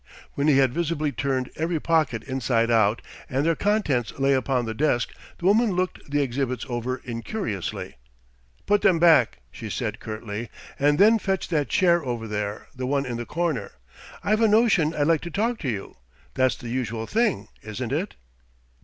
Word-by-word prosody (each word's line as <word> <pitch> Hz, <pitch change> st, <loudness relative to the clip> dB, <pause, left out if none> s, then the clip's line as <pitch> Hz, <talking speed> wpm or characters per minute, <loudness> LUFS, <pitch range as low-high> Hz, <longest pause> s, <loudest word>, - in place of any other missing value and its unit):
When 140 Hz, +1 st, 0 dB
he 145 Hz, -3 st, +5 dB
had 135 Hz, -3 st, +3 dB
visibly 160 Hz, -3 st, -1 dB
turned 130 Hz, +1 st, -2 dB
every 160 Hz, +1 st, -1 dB
pocket 150 Hz, -9 st, +1 dB
inside 125 Hz, -3 st, 0 dB
out, 110 Hz, -1 st, +3 dB, 0.3 s
and 135 Hz, +3 st, 0 dB
their 165 Hz, 0 st, +3 dB
contents 175 Hz, -, +1 dB
lay 135 Hz, 0 st, +3 dB
upon 130 Hz, -1 st, +1 dB
the 110 Hz, -, -3 dB
desk, 125 Hz, -1 st, 0 dB, 0.2 s
the 175 Hz, -, -7 dB
woman 210 Hz, +2 st, +4 dB
looked 180 Hz, +1 st, -1 dB
the 145 Hz, 0 st, +2 dB
exhibits 130 Hz, -2 st, -2 dB
over 125 Hz, +1 st, -2 dB
incuriously. 115 Hz, -, -4 dB, 0.7 s
"Put 205 Hz, 0 st, +3 dB
them 180 Hz, -3 st, +4 dB
back," 155 Hz, -, +4 dB
she -, -, -7 dB
said -, -, -3 dB
curtly. 110 Hz, 0 st, -6 dB, 0.3 s
"And 145 Hz, +1 st, +3 dB
then 220 Hz, +3 st, +6 dB
fetch 195 Hz, -2 st, -2 dB
that 150 Hz, -6 st, 0 dB
chair 175 Hz, -2 st, +3 dB
over 120 Hz, -3 st, -3 dB
there 105 Hz, -1 st, -3 dB
the 130 Hz, 0 st, -3 dB
one 140 Hz, +1 st, 0 dB
in 120 Hz, -2 st, -3 dB
the 120 Hz, -, -5 dB
corner. 160 Hz, -11 st, -2 dB, 0.5 s
I've 215 Hz, +2 st, +2 dB
a 225 Hz, -, +6 dB
notion 205 Hz, -8 st, +3 dB
I'd 145 Hz, -, +1 dB
like 165 Hz, -1 st, +3 dB
to 170 Hz, -, -6 dB
talk 225 Hz, +6 st, -1 dB
to 140 Hz, -, -2 dB
you. 100 Hz, -, -5 dB, 0.4 s
That's 130 Hz, -4 st, +2 dB
the 120 Hz, -, -8 dB
usual 115 Hz, -2 st, -2 dB
thing, 210 Hz, -, 0 dB
isn't 110 Hz, +3 st, -5 dB
it?" 165 Hz, +9 st, -2 dB
140 Hz, 180 wpm, -25 LUFS, 120-170 Hz, 0.7 s, then